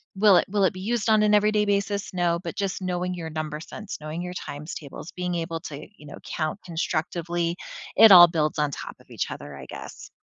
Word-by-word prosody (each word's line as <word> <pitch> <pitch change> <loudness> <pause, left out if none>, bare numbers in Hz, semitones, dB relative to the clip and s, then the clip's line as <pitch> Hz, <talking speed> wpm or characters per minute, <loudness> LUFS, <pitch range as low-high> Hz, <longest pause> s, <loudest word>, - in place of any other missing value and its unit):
will 200 -1 +6
it - - +3
will 200 0 +2
it 190 - +1
be 185 - -8
used 225 +2 -1
on 215 -1 +5
an 210 0 +3
everyday 210 0 +3
basis? 200 0 -1
No, 175 -2 +1
but - - -5
just 195 -1 -2
knowing 180 0 -2
your 165 -2 -5
number 155 -1 -4
sense, 210 +5 -8
knowing 155 +3 -5
your 180 0 -5
times 150 -3 -7
tables, 150 +3 -9
being 180 -1 -3
able 165 -1 -3
to, 150 -1 -8
you 150 - -15
know, 145 - -9
count 155 +4 -3
constructively, 170 0 -2 0.4
it 225 - +9
all 175 -2 +11
builds 155 -2 -1
on 150 -1 +1
top - - -7
of - - -22
each - - -3
other, 75 - -8
I 65 - -9
guess. - - -10
175 Hz, 220 wpm, -25 LUFS, 155-200 Hz, 0.4 s, all